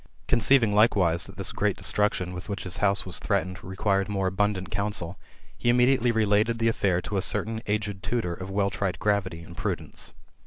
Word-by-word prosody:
Conceiving 120 -2 +4
likewise 95 -6 +3
that 95 0 -13
this 95 -2 +4
great 105 -2 -1
destruction 95 -3 0
with 90 +3 -8
which 100 -1 -4
his 90 -2 -3
house 100 -1 +2
was 90 - -3
threatened 90 +2 -2
required 95 +1 -1
more 100 -2 -1
abundant 95 0 -1
counsel, 100 -2 -2 0.4
he 120 - -1
immediately 125 0 +3
related 110 +1 +2
the 115 0 +1
affair 95 -5 0
to 100 - -3
a - - +1
certain 110 +4 +1
aged 105 -1 -2
tutor 100 -3 -2
of 95 +2 -7
well 100 0 0
tried 95 -3 -2
gravity 95 -5 -1
and 85 +1 -12
prudence. 90 -8 -3
100 Hz, 185 wpm, -26 LUFS, 95-105 Hz, 0.4 s, Conceiving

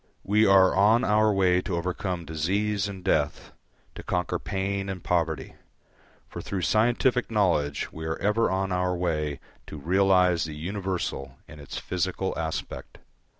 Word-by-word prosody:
We 105 +2 +3
are 95 -1 +5
on 110 +5 +4
our 110 -2 +3
way 90 -2 +3
to 90 -1 -3
overcome 90 0 -3
disease 100 +6 -1
and 95 -2 -8
death, 75 -3 0 0.4
to - - -8
conquer 90 -1 -2
pain 100 0 -3
and 95 -3 -6
poverty; 80 -3 -1 0.7
for - - -7
through 95 -3 -4
scientific 120 +4 +2
knowledge 90 -10 0
we 80 0 -7
are 80 - -2
ever 105 +4 +1
on 95 0 -1
our 90 0 0
way 75 -5 -2 0.3
to 75 - -8
realise 90 +2 +3
the 75 -1 -6
universal 85 -6 -4
in 75 - -12
its 70 - -8
physical 95 +1 -2
aspect. 80 -1 -5
90 Hz, 150 wpm, -26 LUFS, 80-100 Hz, 0.7 s, are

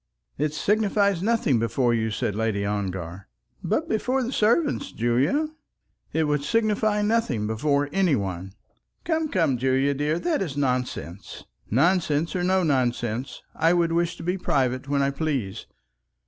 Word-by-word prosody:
"It 150 0 +1
signifies 200 -1 +2
nothing 200 - +2
before 120 +1 +1
you," 110 -1 0
said 105 -1 -2
Lady 105 -1 -1
Ongar. 95 -3 -4 0.4
"But - - 0
before 255 +4 0
the 245 - -3
servant, 245 +7 +2
Julie 130 - +1 0.3
?" - - -54 0.3
"It 160 - +1
would 150 -1 0
signify 215 +2 +1
nothing 210 - +1
before 140 +6 +1
anybody." 100 - 0 0.5
"Come, 320 -2 0
come, 160 - +1
Julie, 135 +2 +2
dear; 150 +3 0
that 315 - 0
is 150 -7 -3
nonsense." 125 -9 -3 0.3
"Nonsense 160 - +2
or 180 - 0
no 185 +1 +2
nonsense, 125 -4 -1
I 165 +2 +3
would 170 -1 +2
wish 170 0 0
to - - -8
be 180 +3 -1
private 130 -4 0
when 140 0 +1
I 140 - +1
please. 135 -10 -3
145 Hz, 145 wpm, -25 LUFS, 120-190 Hz, 0.5 s, I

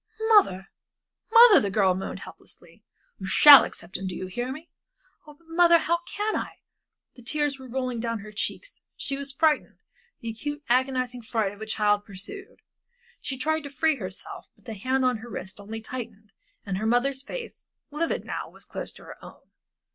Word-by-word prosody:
"Mother, 195 - +4 0.6
mother," 460 -2 +9
the 200 - -1
girl 195 -2 +3
moaned, 190 +1 -5
helplessly. - - -14 0.4
"You - - -6
shall 290 -2 +10
accept 185 - -7
him, 190 - -5
do 180 - -5
you 185 - -5
hear 240 +7 -4
me?" 310 +5 -9 0.6
"But, 295 -1 -14
mother, 335 +1 +5
how 340 +1 0
can 420 +1 -2
I?" - - -3 0.6
The 245 - -15
tears 290 +2 -1
were 260 - -10
rolling 255 -1 -3
down 230 -2 -3
her 215 +1 -10
cheeks, - - -5
she 275 - -4
was 280 0 -5
frightened 300 +2 +1 0.4
the 230 - -5
acute, 290 +6 -6
agonizing 255 0 0
fright 220 -3 -1
of 205 +1 -14
a 220 - -6
child 210 -1 +1
pursued. 390 - -9 0.6
She 265 - -5
tried 315 +4 0
to 285 - -8
free 315 +1 +1
herself, 245 - -8
but - - -29
the 225 - -6
hands 260 +6 -1
on 250 -2 +2
her 230 +2 -11
wrist 190 -2 -7
only 220 +2 -7
tightened, 220 -3 -8 0.3
and 190 -2 -3
her 220 - -1
mother's 260 +3 +1
face, 470 - -8 0.2
livid 325 +3 -2
now, - - -5
was - - -11
close - - -6
to - - -15
her - - -12
own. - - -15
255 Hz, 185 wpm, -26 LUFS, 215-300 Hz, 0.6 s, shall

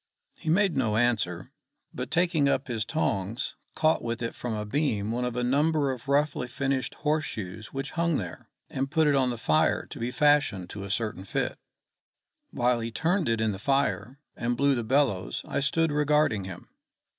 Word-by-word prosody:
He 160 - -4
made 190 +2 +3
no 110 -5 +1
answer, 105 -7 0 0.4
but - - -5
taking 165 -4 +2
up 140 0 0
his 115 -4 -2
tongs 110 -6 -1 0.2
caught 160 0 +3
with 115 0 -3
it 115 - -2
from 120 -3 -4
a 105 0 -3
beam 110 -4 0
one 125 +2 -1
of 125 -1 -3
a 125 - 0
number 145 +2 +2
of 125 0 -7
roughly 140 -2 +1
finished 135 0 -1
horse 155 +1 0
shoes 110 -2 -6
which 135 +1 -4
hung 170 -2 +1
there, 90 -4 -7 0.2
and 135 +1 -2
put 160 +1 +3
it 145 - +4
on 130 -2 +3
the 120 - -3
fire 80 -8 +2
to - - -9
be 120 +1 -1
fashioned 140 -11 +2
to 100 -1 -6
a - - -7
certain 105 -2 -2
fit. 100 - -2 0.9
While 120 0 +1
he 115 0 -3
turned 165 - 0
it 115 -1 +1
in 110 -1 +1
the 95 - -6
fire, 130 -2 0 0.2
and 120 0 -1
blew 140 0 +4
the 120 -3 -1
bellows, 120 -6 +1
I - - -1
stood 165 +3 +2
regarding 150 -8 +2
him. 95 -2 -9
125 Hz, 190 wpm, -27 LUFS, 110-145 Hz, 0.9 s, it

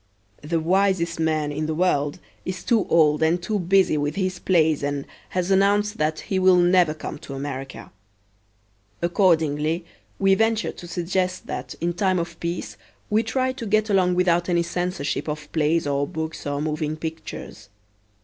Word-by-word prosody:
The 165 +3 -1
wisest 175 0 +1
man 155 -2 0
in 155 +1 -2
the 155 - -2
world 145 -5 +1 0.3
is 185 -1 -5
too 235 -4 +2
old 155 -2 +4
and 160 +2 +3
too 205 +4 -2
busy 185 -3 +3
with 145 +1 -1
his 185 -2 -1
plays 160 -5 +2
and 145 0 -2 0.2
has 185 +1 -1
announced 205 +2 +2
that 155 +1 0
he 190 - -1
will 185 0 +6
never 175 -3 +4
come 155 -1 -7
to 140 - -8
America. 135 -1 -6 1.1
Accordingly 165 -2 +2 0.3
we 195 0 +4
venture 225 +2 +1
to 175 - -11
suggest 180 +1 -2
that - - -5
in 175 +1 -1
time 185 +1 +1
of 170 -1 -4
peace 170 -12 -4 0.3
we 215 +1 +4
try 255 +3 0
to 255 -2 -7
get 215 +1 +2
along 180 -2 +3
without 175 -1 +2
any 170 -1 +2
censorship 175 -4 -2
of 150 -1 -5
plays 160 +1 +1
or 140 0 0
books 160 0 -5
or 145 +1 -2
moving 155 0 -2
pictures. 160 -9 -7
170 Hz, 165 wpm, -23 LUFS, 155-185 Hz, 1.1 s, will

